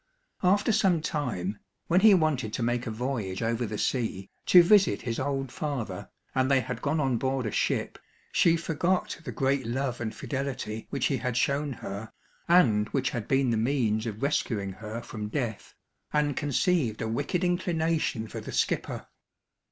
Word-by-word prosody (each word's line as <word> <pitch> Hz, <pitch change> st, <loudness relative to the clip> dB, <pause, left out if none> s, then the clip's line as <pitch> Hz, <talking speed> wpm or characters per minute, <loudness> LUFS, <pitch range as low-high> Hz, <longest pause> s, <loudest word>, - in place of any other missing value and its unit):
After 200 Hz, +5 st, +3 dB
some 190 Hz, -5 st, +3 dB
time, 115 Hz, -, -2 dB, 0.3 s
when 175 Hz, +2 st, +3 dB
he 215 Hz, -2 st, +8 dB
wanted 145 Hz, -, 0 dB
to 120 Hz, -, -1 dB
make 120 Hz, +1 st, 0 dB
a -, -, -1 dB
voyage 110 Hz, -4 st, -3 dB
over 115 Hz, +1 st, 0 dB
the 105 Hz, -, -4 dB
sea, 105 Hz, -6 st, -2 dB, 0.2 s
to 180 Hz, -1 st, +9 dB
visit 195 Hz, -, +4 dB
his 115 Hz, -1 st, -2 dB
old 135 Hz, -2 st, -2 dB
father, 140 Hz, -7 st, -4 dB, 0.2 s
and 130 Hz, 0 st, +2 dB
they 135 Hz, -2 st, +4 dB
had 125 Hz, 0 st, -5 dB
gone 155 Hz, +2 st, 0 dB
on 135 Hz, -4 st, +1 dB
board 130 Hz, -1 st, -1 dB
a 110 Hz, -, -2 dB
ship, -, -, -1 dB, 0.3 s
she 165 Hz, -1 st, +4 dB
forgot 170 Hz, +4 st, -1 dB
the -, -, -5 dB
great 135 Hz, -2 st, 0 dB
love 125 Hz, 0 st, -2 dB
and 110 Hz, -2 st, -3 dB
fidelity 130 Hz, -6 st, -4 dB
which 135 Hz, -3 st, -1 dB
he 135 Hz, -, +1 dB
had 125 Hz, 0 st, -2 dB
shown 140 Hz, +2 st, +1 dB
her, 100 Hz, -1 st, -7 dB, 0.4 s
and 115 Hz, -12 st, +4 dB
which 135 Hz, -2 st, 0 dB
had 115 Hz, -4 st, -4 dB
been 135 Hz, -2 st, +2 dB
the 115 Hz, -, +1 dB
means 115 Hz, -2 st, +1 dB
of 110 Hz, +2 st, -5 dB
rescuing 110 Hz, -8 st, 0 dB
her 110 Hz, +4 st, -7 dB
from 105 Hz, -3 st, -5 dB
death, 115 Hz, -2 st, -4 dB, 0.4 s
and 150 Hz, -2 st, +1 dB
conceived 145 Hz, -, +1 dB
a -, -, -2 dB
wicked 145 Hz, +10 st, -1 dB
inclination 165 Hz, -9 st, 0 dB
for -, -, -6 dB
the -, -, -7 dB
skipper. -, -, -1 dB
130 Hz, 175 wpm, -28 LUFS, 110-150 Hz, 0.4 s, to